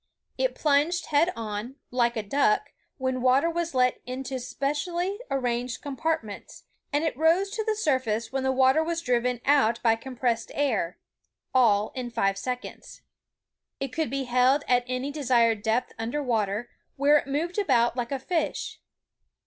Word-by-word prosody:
It -, -, 0 dB
plunged 310 Hz, +4 st, +2 dB
head 315 Hz, +5 st, +4 dB
on, 220 Hz, +3 st, -5 dB, 0.2 s
like 235 Hz, -1 st, +1 dB
a 220 Hz, -, -1 dB
duck, 210 Hz, 0 st, +1 dB, 0.3 s
when 260 Hz, -2 st, -1 dB
water 265 Hz, +6 st, +3 dB
was 335 Hz, -3 st, -3 dB
let 250 Hz, -1 st, +2 dB
into 260 Hz, +1 st, -4 dB
specially 340 Hz, -, -2 dB
arranged 245 Hz, -2 st, -1 dB
compartments, 285 Hz, -6 st, -4 dB, 0.3 s
and 290 Hz, +1 st, +1 dB
it 320 Hz, -, -1 dB
rose 335 Hz, +7 st, +3 dB
to 440 Hz, -, -2 dB
the 435 Hz, 0 st, 0 dB
surface 255 Hz, -, 0 dB
when 270 Hz, 0 st, -1 dB
the 265 Hz, 0 st, +1 dB
water 265 Hz, +4 st, +4 dB
was 335 Hz, +1 st, -2 dB
driven 245 Hz, -1 st, 0 dB
out 270 Hz, -5 st, +3 dB
by 225 Hz, -2 st, +4 dB
compressed 240 Hz, -1 st, -2 dB
air, 225 Hz, -11 st, 0 dB, 0.3 s
— -, -, -57 dB
all 215 Hz, -5 st, +4 dB
in 250 Hz, -2 st, -4 dB
five 195 Hz, -4 st, 0 dB
seconds. 250 Hz, +3 st, -6 dB, 0.8 s
It 270 Hz, -2 st, -4 dB
could 320 Hz, -2 st, -1 dB
be 275 Hz, +1 st, -2 dB
held 255 Hz, +3 st, +3 dB
at 245 Hz, -1 st, +3 dB
any 255 Hz, +3 st, -2 dB
desired 235 Hz, -7 st, +2 dB
depth 230 Hz, +3 st, 0 dB
under 240 Hz, +6 st, -2 dB
water, 220 Hz, -2 st, -1 dB, 0.2 s
where 285 Hz, +2 st, +5 dB
it -, -, -9 dB
moved 330 Hz, +7 st, -1 dB
about 240 Hz, -, +2 dB
like 245 Hz, 0 st, -3 dB
a 275 Hz, -, 0 dB
fish. 320 Hz, +4 st, -2 dB
260 Hz, 160 wpm, -26 LUFS, 235-295 Hz, 0.8 s, where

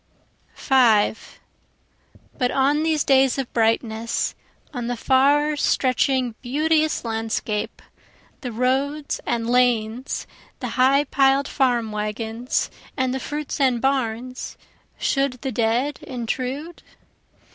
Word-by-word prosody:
5 230 Hz, -5 st, +2 dB, 1.0 s
But 250 Hz, -3 st, 0 dB
on 280 Hz, +4 st, +2 dB
these 315 Hz, -2 st, +1 dB
days 270 Hz, -1 st, +4 dB
of 270 Hz, -3 st, -4 dB
brightness, 225 Hz, 0 st, 0 dB, 0.4 s
On 245 Hz, -3 st, -4 dB
the 245 Hz, 0 st, -2 dB
far 285 Hz, +4 st, +3 dB
stretching 260 Hz, -3 st, +1 dB
beauteous 310 Hz, +3 st, +1 dB
landscape, 225 Hz, -1 st, -3 dB, 0.6 s
the 250 Hz, -, -5 dB
roads 270 Hz, +5 st, -1 dB
and 230 Hz, -1 st, -1 dB
lanes 245 Hz, 0 st, +1 dB, 0.3 s
the -, -, -4 dB
high 270 Hz, +2 st, +3 dB
piled 275 Hz, 0 st, +2 dB
farm 240 Hz, -5 st, +1 dB
wagons, 220 Hz, +3 st, -2 dB, 0.3 s
and 260 Hz, -1 st, 0 dB
the 265 Hz, -, -2 dB
fruits 295 Hz, +2 st, -4 dB
and 255 Hz, -3 st, +3 dB
barns, 255 Hz, -1 st, -2 dB, 0.4 s
Should 275 Hz, -1 st, +1 dB
the 265 Hz, -, -2 dB
dead 240 Hz, +5 st, 0 dB
intrude? 265 Hz, +3 st, -4 dB
255 Hz, 105 wpm, -23 LUFS, 230-275 Hz, 1.0 s, days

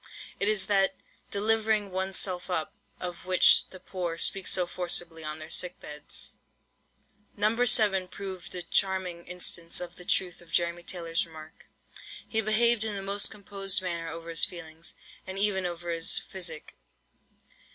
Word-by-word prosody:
It 200 Hz, -, +5 dB
is 215 Hz, -2 st, +3 dB
that 195 Hz, -1 st, +2 dB, 0.3 s
"delivering 215 Hz, -1 st, +2 dB
one's 190 Hz, 0 st, -1 dB
self 185 Hz, -1 st, -1 dB
up," 160 Hz, -4 st, -2 dB, 0.3 s
of 180 Hz, 0 st, -6 dB
which 185 Hz, -1 st, +6 dB
the 185 Hz, -, -11 dB
poor 180 Hz, -2 st, -4 dB
speak 195 Hz, +2 st, 0 dB
so 180 Hz, -, +2 dB
forcibly 175 Hz, -2 st, 0 dB
on 155 Hz, 0 st, -4 dB
their 155 Hz, +1 st, -9 dB
sick 180 Hz, 0 st, +1 dB
beds. 150 Hz, 0 st, -6 dB, 1.0 s
No. 220 Hz, +4 st, +2 dB
7 200 Hz, -5 st, +4 dB
proved 185 Hz, -1 st, -7 dB
a 180 Hz, -, -4 dB
charming 185 Hz, -2 st, -1 dB
instance 175 Hz, -1 st, 0 dB
of 175 Hz, -1 st, -7 dB
the 180 Hz, -, -10 dB
truth 180 Hz, -2 st, 0 dB
of 170 Hz, -, -17 dB
Jeremy 170 Hz, 0 st, +1 dB
Taylor's 170 Hz, -1 st, -2 dB
remark. 160 Hz, -1 st, -13 dB, 0.6 s
He 220 Hz, -, +2 dB
behaved 220 Hz, +1 st, +4 dB
in 215 Hz, -2 st, -1 dB
the 195 Hz, -, -4 dB
most 200 Hz, +1 st, +4 dB
composed 195 Hz, -2 st, -1 dB
manner 170 Hz, -2 st, -3 dB
over 165 Hz, +1 st, -7 dB
his 165 Hz, -, +1 dB
feelings, 165 Hz, -2 st, -4 dB, 0.3 s
and 190 Hz, 0 st, -5 dB
even 195 Hz, -2 st, +3 dB
over 175 Hz, 0 st, -5 dB
his 165 Hz, -1 st, +1 dB
physic. 170 Hz, -5 st, -5 dB
180 Hz, 155 wpm, -29 LUFS, 170-195 Hz, 1.0 s, which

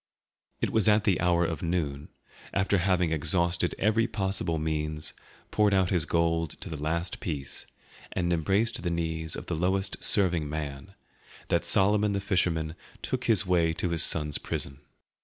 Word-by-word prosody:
It -, -, 0 dB
was 110 Hz, -2 st, +3 dB
at 105 Hz, 0 st, +4 dB
the 95 Hz, -5 st, +1 dB
hour 85 Hz, 0 st, +3 dB
of 80 Hz, -2 st, -3 dB
noon, 80 Hz, -4 st, -2 dB, 0.5 s
after 95 Hz, 0 st, +2 dB
having 90 Hz, -2 st, +1 dB
exhausted 85 Hz, +3 st, +1 dB
every 110 Hz, +3 st, +2 dB
possible 95 Hz, -6 st, -1 dB
means, 75 Hz, 0 st, -1 dB, 0.4 s
poured 105 Hz, -2 st, +3 dB
out 95 Hz, -2 st, +2 dB
his 85 Hz, -5 st, +1 dB
gold 85 Hz, -1 st, 0 dB
to -, -, -6 dB
the 75 Hz, -2 st, -5 dB
last 85 Hz, +3 st, -2 dB
piece, 70 Hz, -6 st, -4 dB, 0.4 s
and 85 Hz, -1 st, 0 dB
embraced 95 Hz, +7 st, +1 dB
the 85 Hz, -, -2 dB
knees 80 Hz, -1 st, -2 dB
of -, -, -7 dB
the -, -, -4 dB
lowest 95 Hz, +4 st, 0 dB
serving 85 Hz, -7 st, +3 dB
man, 75 Hz, +4 st, -6 dB, 0.5 s
that -, -, +1 dB
Solomon 105 Hz, +1 st, +3 dB
the 100 Hz, -, 0 dB
fisherman 85 Hz, -5 st, 0 dB, 0.3 s
took 130 Hz, -1 st, -2 dB
his 110 Hz, -4 st, +3 dB
way 85 Hz, -3 st, +2 dB
to 85 Hz, +2 st, -2 dB
his 85 Hz, -2 st, 0 dB
son's 75 Hz, -2 st, +2 dB
prison. 70 Hz, 0 st, -4 dB
85 Hz, 160 wpm, -28 LUFS, 80-95 Hz, 0.5 s, at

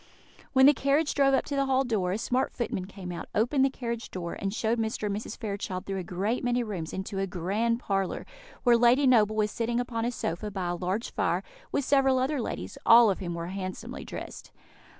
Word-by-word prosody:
When 265 Hz, 0 st, +6 dB
the 290 Hz, -, +8 dB
carriage 285 Hz, +3 st, +1 dB
drove 275 Hz, -1 st, +4 dB
up -, -, 0 dB
to 285 Hz, -, -3 dB
the 275 Hz, 0 st, +1 dB
hall 265 Hz, 0 st, +3 dB
door, 210 Hz, -8 st, 0 dB
a 195 Hz, -, 0 dB
smart 250 Hz, +3 st, 0 dB
footman 205 Hz, -6 st, -3 dB
came 190 Hz, -2 st, -8 dB
out, 175 Hz, -, -6 dB
opened 250 Hz, +6 st, +3 dB
the 270 Hz, -, +4 dB
carriage 235 Hz, -3 st, -5 dB
door, 170 Hz, -2 st, -5 dB
and 195 Hz, -, -3 dB
showed 225 Hz, +2 st, 0 dB
Mr. 220 Hz, -1 st, -2 dB
and 200 Hz, -1 st, -1 dB
Mrs. 210 Hz, +1 st, -6 dB
Fairchild 200 Hz, -4 st, -4 dB
through 195 Hz, -1 st, -3 dB
a -, -, -4 dB
great 195 Hz, +7 st, -2 dB
many 245 Hz, 0 st, +1 dB
rooms 185 Hz, -8 st, -5 dB
into 195 Hz, +1 st, -4 dB
a 195 Hz, -, 0 dB
grand 205 Hz, +7 st, 0 dB
parlour, 195 Hz, -4 st, -2 dB, 0.4 s
where 240 Hz, -2 st, +6 dB
Lady 245 Hz, +4 st, +5 dB
Noble 215 Hz, -4 st, +4 dB
was 210 Hz, -1 st, +1 dB
sitting 235 Hz, +1 st, -1 dB
upon 235 Hz, -2 st, -2 dB
a 240 Hz, -, 0 dB
sofa, 210 Hz, -2 st, -3 dB
by 190 Hz, -3 st, -3 dB
a 175 Hz, -, -1 dB
large 185 Hz, +6 st, -2 dB
fire, -, -, 0 dB, 0.3 s
with 280 Hz, -, 0 dB
several 270 Hz, -2 st, +4 dB
other 265 Hz, +1 st, 0 dB
ladies, 95 Hz, -, -5 dB
all 230 Hz, -2 st, +7 dB
of 190 Hz, -, -3 dB
whom 175 Hz, -2 st, -4 dB
were 170 Hz, +1 st, -4 dB
handsomely 185 Hz, -1 st, -5 dB
dressed. -, -, -8 dB
220 Hz, 220 wpm, -28 LUFS, 190-250 Hz, 0.4 s, the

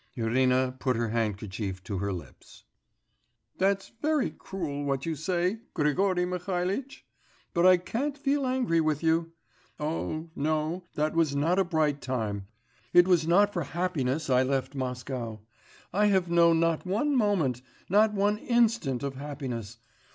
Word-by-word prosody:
Irina 125 Hz, +2 st, +2 dB
put 130 Hz, -2 st, +1 dB
her 115 Hz, 0 st, -1 dB
handkerchief 105 Hz, -3 st, -3 dB
to 95 Hz, 0 st, -4 dB
her 100 Hz, +1 st, -1 dB
lips. 85 Hz, -7 st, -10 dB, 1.0 s
'That's 195 Hz, +1 st, +1 dB
very 305 Hz, -3 st, +1 dB
cruel, 150 Hz, -7 st, -5 dB
what 135 Hz, -1 st, -1 dB
you 165 Hz, -, -1 dB
say, 180 Hz, +6 st, -1 dB, 0.2 s
Grigory 180 Hz, +4 st, +2 dB
Mihalitch; 180 Hz, +7 st, -3 dB, 0.5 s
but 175 Hz, +1 st, +4 dB
I 185 Hz, 0 st, +7 dB
can't 260 Hz, +11 st, -3 dB
feel 280 Hz, -1 st, 0 dB
angry 250 Hz, -11 st, +1 dB
with 155 Hz, -1 st, 0 dB
you. 165 Hz, +1 st, +1 dB, 0.5 s
Oh, 155 Hz, +1 st, -3 dB
no, 155 Hz, +4 st, -1 dB
that 155 Hz, +1 st, 0 dB
was 160 Hz, -4 st, +2 dB
not 165 Hz, +6 st, +2 dB
a -, -, +5 dB
bright 155 Hz, -5 st, 0 dB
time, 105 Hz, -6 st, -3 dB, 0.5 s
it 175 Hz, 0 st, +7 dB
was 170 Hz, -4 st, +3 dB
not 200 Hz, +4 st, +4 dB
for 175 Hz, -, -1 dB
happiness 155 Hz, -3 st, -1 dB
I 130 Hz, -1 st, +4 dB
left 135 Hz, +1 st, -1 dB
Moscow; 125 Hz, -4 st, -4 dB, 0.5 s
I 210 Hz, +3 st, +3 dB
have 190 Hz, -4 st, +2 dB
known 170 Hz, -1 st, +5 dB
not 165 Hz, -1 st, +1 dB
one 225 Hz, +11 st, 0 dB
moment, 185 Hz, -, +1 dB, 0.3 s
not 210 Hz, +3 st, +4 dB
one 205 Hz, +1 st, +1 dB
instant 225 Hz, -, +1 dB
of 140 Hz, -1 st, -2 dB
happiness 130 Hz, -6 st, -6 dB
160 Hz, 145 wpm, -28 LUFS, 130-190 Hz, 1.0 s, I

